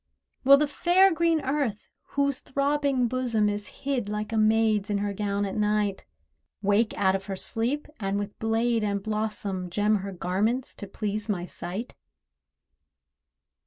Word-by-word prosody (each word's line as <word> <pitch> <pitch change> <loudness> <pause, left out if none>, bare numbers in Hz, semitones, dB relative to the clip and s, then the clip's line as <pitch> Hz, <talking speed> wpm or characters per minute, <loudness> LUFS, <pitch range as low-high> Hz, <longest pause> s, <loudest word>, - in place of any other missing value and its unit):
Will 275 +1 +8
the 300 +1 +2
fair 360 +5 +4
green 330 -1 +2
Earth, 270 -6 -1 0.3
whose 280 -2 +2
throbbing 280 -2 +1
bosom 235 -4 +1
Is 205 0 -2 0.2
hid 255 -7 -1
like 210 +1 -3
a - - 0
maid's 215 -1 +3
in 205 - +1
her 205 0 -1
gown 200 0 -1
at 195 - -4
night, 210 -2 0 0.6
Wake 205 +3 +2
out 190 -2 +3
of 195 0 -4
her 195 - -3
sleep, 240 +9 -1
and 195 -1 -1
with 205 0 -5
blade 225 +1 +1
and 200 -1 -1
blossom 210 -4 -2
Gem 210 +4 +2
her 195 0 -5
garments 200 +8 -1
to 205 - -6
please 210 +2 -4
my 180 -4 -1
sight? 190 +6 -6
215 Hz, 155 wpm, -27 LUFS, 200-255 Hz, 0.6 s, Will